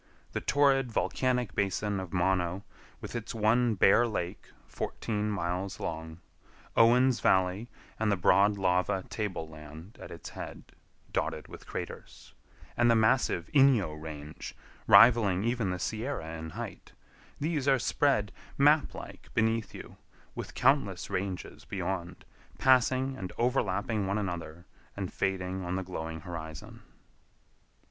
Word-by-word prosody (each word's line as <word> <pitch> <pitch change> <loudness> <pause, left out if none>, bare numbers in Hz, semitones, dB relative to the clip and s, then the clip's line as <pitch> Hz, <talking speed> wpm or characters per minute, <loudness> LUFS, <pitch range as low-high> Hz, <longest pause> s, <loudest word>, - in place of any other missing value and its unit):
The - - -3
torrid 135 -3 +3
volcanic 125 -1 0
basin 100 +1 -1
of 95 -3 -6
Mono, 90 0 0 0.4
with - - -7
its 115 -1 -5
one 115 +1 +3
bare 110 +5 +5
lake 90 -6 -4 0.2
fourteen 105 -2 -3
miles 95 -1 -3
long; 80 +1 -5 0.5
Owen's 125 +2 +5
Valley 95 +5 +2 0.3
and 110 -1 +2
the 100 - +2
broad 100 +3 +4
lava 95 +1 +1
table 100 -7 -3
land 80 +5 -12
at - - -8
its - - -9
head, - - -9 0.4
dotted - - -2
with - - -12
craters, - - -8 0.4
and 120 0 +3
the 115 - +5
massive 110 -6 +2
Inyo 130 - +5
Range, 75 -1 -8 0.3
rivaling 105 -6 +6
even 115 -3 0
the 90 - -2
Sierra 110 - -3
in 80 0 -6
height; - - -8 0.5
these 150 -2 -1
are 135 -1 +5
spread, 120 -4 +1 0.3
map 145 +2 +4
like, - - -10
beneath 110 0 +1
you, - - -10 0.4
with - - -7
countless 125 -9 +2
ranges 95 -1 -4
beyond, 90 -2 -4 0.3
passing 130 +1 +3
and 95 -7 -6
overlapping 110 -4 0
one 100 +2 0
another 85 -4 -5 0.3
and 95 -3 -4
fading 95 -1 -2
on 90 +1 -2
the 95 - -2
glowing 80 -3 -5
horizon. 80 -3 -8
100 Hz, 130 wpm, -30 LUFS, 90-120 Hz, 0.5 s, rivaling